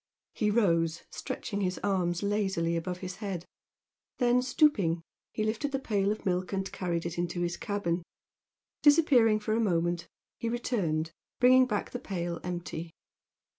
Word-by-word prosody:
He 210 -3 +1
rose, 170 -7 +2
stretching 200 0 -4
his 185 -1 0
arms 180 -3 0
lazily 190 -5 0
above 180 +2 -3
his 185 0 -5
head, 195 -5 -4 0.7
then, 245 0 +3
stooping, 240 - +2 0.3
he 215 - -2
lifted 220 +7 -1
the 270 - 0
pail 205 -6 0
of 215 - -5
milk 185 0 0
and 190 0 -2
carried 170 -2 -2
it 170 0 -3
into 175 0 -1
his 175 0 0
cabin. 180 -4 -1 0.8
Disappearing 275 -8 +5
for 215 +1 -1
a 225 - +2
moment, 175 -4 +1 0.3
he 230 - -1
returned, 175 -10 -1 0.3
bringing 255 +1 +6
back 210 -4 -2
the 245 - -4
pail 175 -7 -3
empty. 175 -2 -4
195 Hz, 150 wpm, -30 LUFS, 175-225 Hz, 0.8 s, bringing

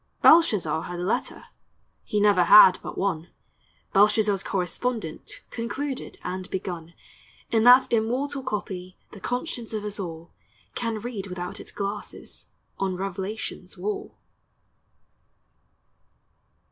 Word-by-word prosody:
Belshazzar 210 - +5
had 175 0 -6
a - - -3
letter, 190 - -2 0.6
He 210 - -1
never 205 -4 +4
had 185 0 +9
but - - -7
one; 175 -4 -1 0.7
Belshazzar's 205 -1 +4
correspondent 195 0 -3
Concluded 260 +4 -4
and 185 +1 -5
begun 170 -3 -5 0.6
In 225 0 +3
that 250 0 +7
immortal 255 +5 0
copy 185 -6 -5
The 205 - -11
conscience 245 - -3
of 210 -1 -3
us 210 0 -4
all 170 -3 -6 0.4
Can 230 -2 -2
read 220 -4 -5
without 180 +2 -6
its - - -10
glasses 200 +1 -6 0.3
On 190 -1 -1
revelation's 195 +3 -5
wall. 415 -1 -4
205 Hz, 110 wpm, -25 LUFS, 185-235 Hz, 0.7 s, had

